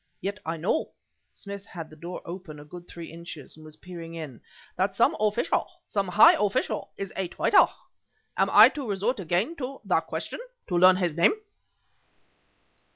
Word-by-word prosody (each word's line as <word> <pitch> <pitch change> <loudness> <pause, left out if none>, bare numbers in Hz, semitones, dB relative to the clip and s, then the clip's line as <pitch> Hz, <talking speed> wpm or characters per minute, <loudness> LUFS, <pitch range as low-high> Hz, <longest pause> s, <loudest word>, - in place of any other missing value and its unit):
Yet 200 +2 -4
I 165 +1 -2
know" 180 - -1 0.4
(Smith 200 -1 -9
had 165 -3 -8
the - - -12
door 170 +3 -8
open 170 -4 -8
a 145 - -11
good 175 +3 -11
three 170 -1 -9
inches 165 -4 -9
and 155 - -15
was 155 0 -12
peering 165 0 -9
in) 150 -8 -8 0.3
"that 190 +1 0
some 230 - +3
official, 215 +7 +1 0.2
some 200 -2 -1
high 180 +4 +7
official, 205 -1 -1
is 195 -1 -5
a 190 -1 -2
traitor. - - +4 0.7
Am - - +2
I - - +9
to 275 -6 -6
resort 205 +5 -1
again 190 - 0
to 270 0 -5
the - - +2
question - - -5 0.3
to 180 - -1
learn 185 +1 +7
his 175 -4 -1
name?" 170 - +5
180 Hz, 170 wpm, -27 LUFS, 165-200 Hz, 0.7 s, I